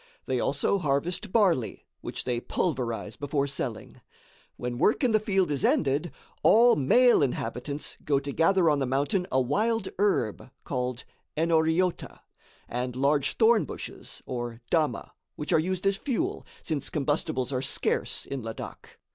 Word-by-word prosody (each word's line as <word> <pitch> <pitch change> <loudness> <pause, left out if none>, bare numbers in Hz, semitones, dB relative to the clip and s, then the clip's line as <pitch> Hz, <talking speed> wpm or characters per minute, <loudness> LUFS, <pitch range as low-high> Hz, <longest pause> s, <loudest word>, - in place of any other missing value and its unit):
They - - 0
also 200 - +1
harvest 165 +6 -1
barley, 180 - +1 0.2
which - - -5
they 120 -2 -1
pulverize 120 - -2
before 140 0 -1
selling. 135 -5 -5 0.6
When 120 0 -4
work 210 - +3
in 250 - +4
the 215 - +4
field 195 -6 +1
is 140 - -1
ended, 145 +3 +2 0.3
all 235 +2 +6
male 240 - +5
inhabitants 140 +1 -3
go 145 -2 +2
to 140 +1 -5
gather 170 +3 +3
on 150 -2 +3
the 135 - 0
mountain 145 +8 0
a 130 - +3
wild 215 - 0
herb 130 - 0
called 125 -2 -3 0.3
"enoriota," 165 +2 +1 0.5
and 125 0 -3
large 140 +2 +1
thorn 225 -1 +5
bushes - - -8
or 120 -2 -5
"dama," 160 -3 0 0.2
which 150 - -3
are - - +5
used 185 +3 -2
as 195 0 +2
fuel, 330 - -2 0.2
since 155 -5 -2
combustibles 145 -3 -1
are 130 - 0
scarce 130 - -1
in 140 -2 -5
Ladak. 115 -1 -8
150 Hz, 145 wpm, -27 LUFS, 130-190 Hz, 0.6 s, all